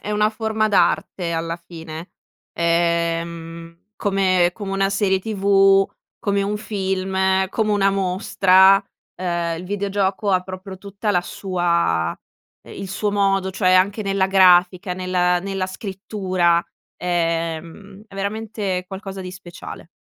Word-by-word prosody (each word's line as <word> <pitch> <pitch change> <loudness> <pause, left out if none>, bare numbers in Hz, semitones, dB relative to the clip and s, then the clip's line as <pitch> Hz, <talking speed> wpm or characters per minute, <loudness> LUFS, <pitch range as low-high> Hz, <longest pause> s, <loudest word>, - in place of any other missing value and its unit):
è 210 - -6
una 210 0 +2
forma 220 0 -1
d'arte 190 -3 +1
alla 165 0 -2
fine, 165 -1 -9 0.4
ehm, 170 +1 -2
come 185 -4 +2
come 195 0 -6
una 195 0 +1
serie 195 -1 +1
tv, 195 -2 +3 0.3
come 200 -1 0
un 205 +1 -1
film, 190 -2 0
come 215 0 -1
una 195 -1 +3
mostra, 190 0 +4 0.3
ehm, 170 -2 -2
il - - -7
videogioco 200 +1 -1
ha 185 - +3
proprio 185 +1 -9
tutta 200 +2 -3
la 180 - +3
sua 170 - 0 0.5
il 195 - -8
suo 205 +1 -2
modo, 195 -1 +1
cioè 185 -1 +2
anche 200 +4 +3
nella 195 -1 +1
grafica, 185 -1 +4
nel 185 0 -6 0.4
nella 195 -1 -2
scrittura, 185 -3 0 0.4
ehm, 170 +3 -3
è - - -15
veramente 200 -2 -3
qualcosa 195 0 -7
di 185 - -6
speciale. 175 -3 -10
190 Hz, 125 wpm, -21 LUFS, 175-200 Hz, 0.5 s, mostra